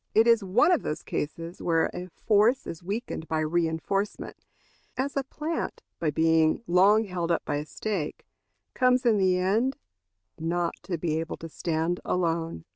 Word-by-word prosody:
It 220 - +6
is 230 -3 +5
one 235 - +4
of 350 - +3
those 150 - -4
cases 165 +3 -4
where 165 -1 +2
a 180 +1 -5
force 215 +7 +2
is 165 - -7
weakened 195 -3 -4
by 160 -1 0
reinforcement 170 +5 -2 0.5
as 275 +2 -1
a 275 - +1
plant, 305 +5 -4 0.2
by 160 - +1
being 160 +5 +3
long 200 +4 +5
held 180 -4 -3
up 170 - 0
by 145 - -1
a 150 +1 -5
stake, 195 -7 -4 0.5
comes 255 0 +3
in 220 -3 +4
the 185 -1 +3
end 215 +9 +1 0.6
not 170 +1 -1
to 180 -3 -2
be 160 -1 -1
able 165 0 -4
to 165 - -8
stand 165 +2 -1
alone. 165 - -1
175 Hz, 165 wpm, -27 LUFS, 165-215 Hz, 0.6 s, It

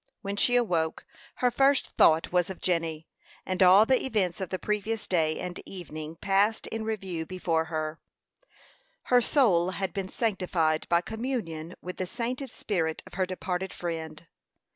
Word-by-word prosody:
When 200 0 -3
she 245 +4 +3
awoke, 170 -10 +1 0.3
her 250 -1 +2
first 275 +2 +3
thought 160 +1 +4
was 180 0 +2
of 190 - -7
Jenny; 165 -3 -1 0.4
and 185 0 -2
all 190 +3 +8
the 260 +1 +2
events 200 -7 0
of 190 - -3
the 185 - -2
previous 210 +2 -2
day 160 -3 +1
and 180 -1 -5
evening 155 -4 -7
passed 200 +5 +1
in 225 0 -4
review 195 -7 -3
before 170 -3 0
her. 155 -1 -3 1.1
Her 245 - +7
soul 195 - +3
had 190 -3 -2
been 195 -1 -3
sanctified 180 -8 0
by 170 0 +4
communion 195 -8 -4
with 180 +1 -6
the 185 - -2
sainted 250 +5 -3
spirit 165 -8 -2
of - - -14
her 185 0 0
departed 185 0 -3
friend. 160 -2 -5
185 Hz, 160 wpm, -28 LUFS, 165-215 Hz, 1.1 s, all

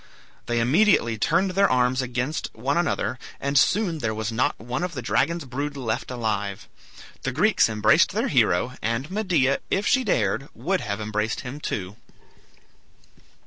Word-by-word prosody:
They 120 0 0
immediately 125 - +3
turned 170 - +2
their 195 +2 +3
arms 125 +1 +2
against 130 +4 -3
one 130 +6 -1
another, 170 -6 -1 0.2
and 140 +1 -2
soon 180 +2 +3
there 110 -5 -2
was 110 +1 -3
not 120 +3 0
one 120 +6 -4
of 180 -1 -3
the 130 - -4
dragon's 170 +6 0
brood 140 +3 -4
left 115 -5 -3
alive. 105 -5 -3 0.5
The - - -2
Greeks - - +3
embraced 105 -1 +4
their - - 0
hero, 120 +9 +2
and 115 +8 -2
Medea, 180 -10 +1
if 195 +2 0
she 260 -2 +3
dared, 135 - 0
would 190 +2 -1
have 100 -3 -3
embraced 105 +1 -2
him 125 +4 -7
too. 100 -7 -4
130 Hz, 155 wpm, -24 LUFS, 110-165 Hz, 0.5 s, embraced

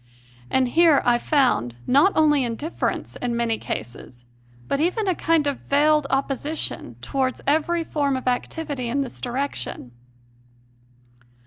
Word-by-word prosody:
And 260 -1 +2
here 320 +1 +4
I 240 -1 +3
found, 245 - +1
not 285 +10 +5
only 295 -3 +4
indifference 245 +7 -3
in 245 -1 -2
many 230 -2 0
cases, 120 +2 -7 0.4
but 280 - 0
even 365 +7 0
a 370 - +3
kind 330 -2 +1
of 285 -2 -1
veiled 300 +1 +2
opposition 275 +3 -2
towards 260 -2 -1
every 320 +4 +1
form 285 -4 0
of 255 - -7
activity 255 0 -2
in 280 +4 0
this 265 - -6
direction. 245 - -4
275 Hz, 130 wpm, -23 LUFS, 245-310 Hz, 0.4 s, not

